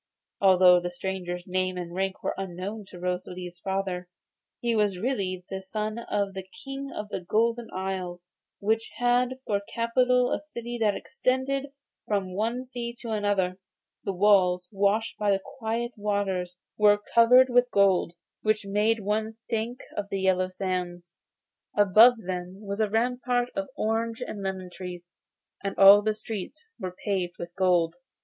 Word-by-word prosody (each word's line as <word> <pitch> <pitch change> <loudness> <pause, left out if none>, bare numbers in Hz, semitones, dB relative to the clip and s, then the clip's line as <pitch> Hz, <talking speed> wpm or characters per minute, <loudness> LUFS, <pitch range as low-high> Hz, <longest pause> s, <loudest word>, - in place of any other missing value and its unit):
Although 185 -2 +7
the 175 0 -3
stranger's 180 -1 -4
name 185 0 -1
and 175 -1 -5
rank 190 +1 -2
were - - 0
unknown 195 +3 -5
to 180 - -11
Rosalie's 180 0 -4
father, 190 -1 -3 0.5
he 235 -1 0
was 205 -3 +2
really 185 -5 -2
the 190 0 -3
son 215 +3 -3
of 205 -4 -2
the 190 - -4 0.2
King 275 0 -5
of 210 0 -6
the - - -3
Golden 230 +5 0
Isle, 185 -2 -3 0.4
which 220 +2 0
had 245 +1 +2
for 200 -1 0
capital 250 +2 +2
a - - 0
city 240 -5 -6
that 210 -2 +3
extended 265 +1 -1 0.4
from 195 -3 -1
one 230 +6 -1
sea 240 -2 -5
to 230 - -5
another. 200 -3 0 0.4
The 195 - -1
walls, 180 -2 +4
washed 205 +2 +1
by 210 -1 +1
the 195 -1 +2 0.2
quiet 230 +1 -2
waters, 195 -4 -1 0.2
were 205 -1 +6
covered 250 +3 +7
with 245 0 +4
gold, 195 -5 +3 0.3
which 215 -1 +1
made 210 +3 +1
one 215 +2 -1
think 230 +2 -2
of 200 -1 -3
the 195 - -2
yellow 185 -1 +2
sands. 180 -2 -4 0.6
Above 215 +5 +7
them 180 +1 -5
was 200 +1 -4
a 215 -1 +2
rampart 245 +2 0
of 195 0 -3
orange 225 +2 -1
and 215 -5 -5
lemon 190 -2 -4
trees, 180 -1 -7 0.6
and 195 - -3
all 200 +1 +9
the 215 0 0
streets 220 - -7
were 185 -3 -5
paved 185 -4 -1
with 170 0 -7
gold. 175 -3 +2
200 Hz, 155 wpm, -27 LUFS, 185-230 Hz, 0.6 s, all